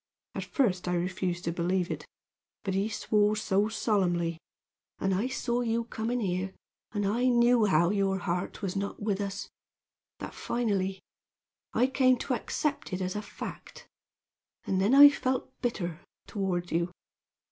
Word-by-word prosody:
At -, -, -4 dB
first 185 Hz, -10 st, 0 dB
I 180 Hz, -, +1 dB
refused 180 Hz, 0 st, -2 dB
to 165 Hz, -, -1 dB
believe 175 Hz, +1 st, 0 dB
it, -, -, -5 dB, 0.6 s
but 195 Hz, -, -1 dB
he 195 Hz, +3 st, +1 dB
swore 210 Hz, -1 st, +2 dB
so 205 Hz, 0 st, +1 dB
solemnly 175 Hz, -7 st, 0 dB, 0.6 s
and 195 Hz, 0 st, 0 dB
I 200 Hz, +7 st, +1 dB
saw 245 Hz, -2 st, -1 dB
you 230 Hz, -1 st, 0 dB
coming 235 Hz, +1 st, -2 dB
here, 185 Hz, -1 st, -2 dB, 0.4 s
and 205 Hz, -2 st, -1 dB
I 230 Hz, +5 st, +1 dB
knew 240 Hz, -2 st, +5 dB
how 170 Hz, -2 st, +3 dB
your 195 Hz, -2 st, +1 dB
heart 180 Hz, +2 st, -3 dB
was 190 Hz, -1 st, -2 dB
not 200 Hz, 0 st, -3 dB
with 205 Hz, -1 st, -1 dB
us 200 Hz, 0 st, -4 dB, 0.7 s
that -, -, -7 dB
finally, 195 Hz, -5 st, -1 dB, 0.7 s
I 250 Hz, -, +4 dB
came 260 Hz, -1 st, +3 dB
to 260 Hz, -, -2 dB
accept 280 Hz, -1 st, -2 dB
it 185 Hz, -, -1 dB
as 185 Hz, 0 st, -2 dB
a 210 Hz, -, -2 dB
fact, -, -, -9 dB, 0.8 s
and 190 Hz, -1 st, +1 dB
then 215 Hz, +7 st, +4 dB
I 290 Hz, +1 st, +12 dB
felt 260 Hz, -1 st, -2 dB
bitter 175 Hz, -9 st, -2 dB, 0.3 s
toward 180 Hz, -4 st, -2 dB
you. 170 Hz, +2 st, +1 dB
200 Hz, 155 wpm, -29 LUFS, 185-235 Hz, 0.8 s, I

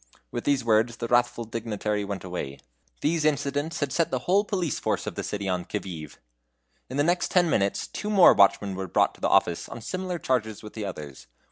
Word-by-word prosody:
With -, -, -4 dB
these 140 Hz, -4 st, +2 dB
words 115 Hz, +1 st, +2 dB
the 115 Hz, -, -3 dB
wrathful 120 Hz, 0 st, +2 dB
dignitary 105 Hz, -2 st, -2 dB
went 100 Hz, -1 st, -5 dB
away. 90 Hz, -7 st, -5 dB, 0.4 s
These 160 Hz, +1 st, +1 dB
incidents 145 Hz, +1 st, 0 dB
had 145 Hz, -2 st, -1 dB
set 165 Hz, -, +2 dB
the 130 Hz, -, 0 dB
whole 195 Hz, +3 st, +4 dB
police 180 Hz, -, -2 dB
force -, -, -1 dB
of -, -, -4 dB
the -, -, -4 dB
city 100 Hz, -1 st, -3 dB
on 90 Hz, -1 st, 0 dB
the -, -, -13 dB
qui -, -, -2 dB, 0.3 s
vive. 75 Hz, -, -18 dB, 0.7 s
In 130 Hz, -, -4 dB
the 145 Hz, -, +3 dB
next 175 Hz, +3 st, +1 dB
ten 180 Hz, -2 st, +4 dB
minutes 100 Hz, -1 st, +1 dB
two 210 Hz, -, -5 dB
more 200 Hz, -4 st, +8 dB
watchmen 100 Hz, 0 st, +4 dB
were 95 Hz, 0 st, -4 dB
brought -, -, +2 dB
to -, -, -20 dB
the -, -, +1 dB
office 85 Hz, -1 st, +2 dB
on -, -, -7 dB
similar 185 Hz, +8 st, -3 dB
charges 110 Hz, -8 st, -1 dB
with 105 Hz, -, -9 dB
the 110 Hz, -2 st, -4 dB
others. 75 Hz, -8 st, -8 dB
115 Hz, 220 wpm, -26 LUFS, 100-155 Hz, 0.7 s, more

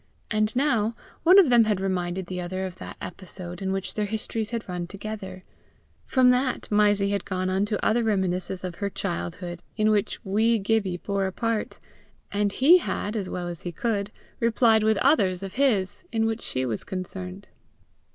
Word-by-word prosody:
And 215 Hz, +1 st, +1 dB
now 235 Hz, -5 st, +2 dB, 0.3 s
one 360 Hz, +4 st, +7 dB
of 370 Hz, -8 st, +7 dB
them 235 Hz, -2 st, +6 dB
had 210 Hz, -3 st, +1 dB
reminded 185 Hz, -1 st, -1 dB
the 180 Hz, 0 st, -4 dB
other 185 Hz, +2 st, -3 dB
of 185 Hz, -1 st, -7 dB
that -, -, -9 dB
episode 180 Hz, 0 st, -8 dB
in 190 Hz, 0 st, -1 dB
which 190 Hz, -1 st, -3 dB
their 210 Hz, -1 st, -1 dB
histories 220 Hz, 0 st, -3 dB
had 235 Hz, -2 st, -4 dB
run 180 Hz, -1 st, -4 dB
together; 200 Hz, -2 st, -7 dB, 0.6 s
from 255 Hz, -1 st, +5 dB
that, 250 Hz, 0 st, 0 dB
Mysie 205 Hz, -1 st, +3 dB
had 200 Hz, -, -1 dB
gone 185 Hz, -1 st, -2 dB
on 190 Hz, +2 st, +2 dB
to 210 Hz, -1 st, -2 dB
other 235 Hz, +2 st, +3 dB
reminiscences 190 Hz, -3 st, -1 dB
of 180 Hz, -2 st, -5 dB
her 200 Hz, -, 0 dB
childhood 175 Hz, -2 st, -4 dB, 0.2 s
in 215 Hz, 0 st, +3 dB
which 210 Hz, 0 st, 0 dB
wee 220 Hz, +4 st, +3 dB
Gibbie 200 Hz, -3 st, 0 dB
bore 195 Hz, +1 st, -1 dB
a -, -, -3 dB
part, 230 Hz, +2 st, -2 dB, 0.5 s
and 205 Hz, 0 st, +1 dB
he 310 Hz, -, +6 dB
had, 210 Hz, -9 st, -3 dB
as 200 Hz, -4 st, -2 dB
well 175 Hz, -1 st, -4 dB
as 170 Hz, -2 st, -6 dB
he 175 Hz, -, -4 dB
could, 205 Hz, +2 st, -2 dB, 0.3 s
replied 230 Hz, -1 st, +4 dB
with 220 Hz, -1 st, +3 dB
others 195 Hz, -, +3 dB
of 195 Hz, 0 st, -6 dB
his, 245 Hz, -, +1 dB
in 225 Hz, -1 st, +1 dB
which 225 Hz, 0 st, -1 dB
she 130 Hz, 0 st, -2 dB
was 115 Hz, -4 st, -3 dB
concerned. 185 Hz, +1 st, -6 dB
200 Hz, 185 wpm, -26 LUFS, 185-225 Hz, 0.6 s, one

